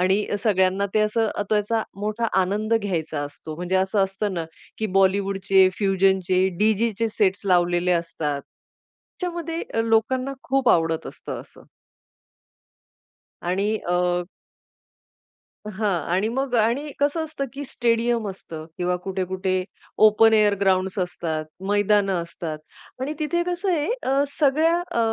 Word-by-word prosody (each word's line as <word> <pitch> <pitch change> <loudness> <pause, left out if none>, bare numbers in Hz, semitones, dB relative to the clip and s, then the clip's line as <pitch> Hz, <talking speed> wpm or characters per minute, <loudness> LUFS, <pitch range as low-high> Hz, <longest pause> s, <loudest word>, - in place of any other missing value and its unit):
आणि 190 +3 +2 0.2
सगळ्यांना 190 -1 +2
ते 215 - +4
असं 215 +1 +1 0.2
त्याचा 215 +1 +1 0.2
मोठा 215 +3 -2 0.2
आनंद 210 +4 0
घ्यायचा 165 -8 -1
असतो, 145 +2 -7
म्हणजे 180 +2 -1
असं 190 +2 +1
असतं 195 +1 -3
ना 170 - -2 0.3
की 220 - 0
बॉलिवूडचे 195 0 +3
फ्युजनचे 190 -2 +2
डीजेचे 220 +1 +1
सेट्स 205 -2 +1
लावलेले 175 0 +3
असतात 165 -4 -2
त्याच्यामध्ये 340 -2 -8
अ, 225 - +2
लोकांना 230 +4 +1
खूप 270 0 +1
आवडत 165 -1 +1
असतं - - -7
असं. - - -16 1.8
आणि 190 +4 0 0.2
अ 180 0 +1 1.5
हां 210 +1 -1 0.2
आणि 195 +4 +2
मग 260 +2 -2
आणि 240 +7 +1
कसं 290 +3 +1
असतं 310 -3 -4
की 285 +1 -6
स्टेडियम 235 -2 0
असतं 165 -5 -8
किंवा 180 0 0
कुठे-कुठे 190 0 -2 0.5
ओपन 220 +1 +5
एअर 210 -1 +4
ग्राउंड्स 190 0 +1
असतात, 165 -3 -2 0.2
मैदान 205 -1 +3
असतात 170 -3 -4 0.4
आणि 285 +4 -2
तिथे 345 +3 0
कसं 360 +2 -2
आहे 295 - 0
सगळ्या 310 +3 +3 0.2
अ, - - -2
205 Hz, 125 wpm, -23 LUFS, 185-230 Hz, 1.8 s, ओपन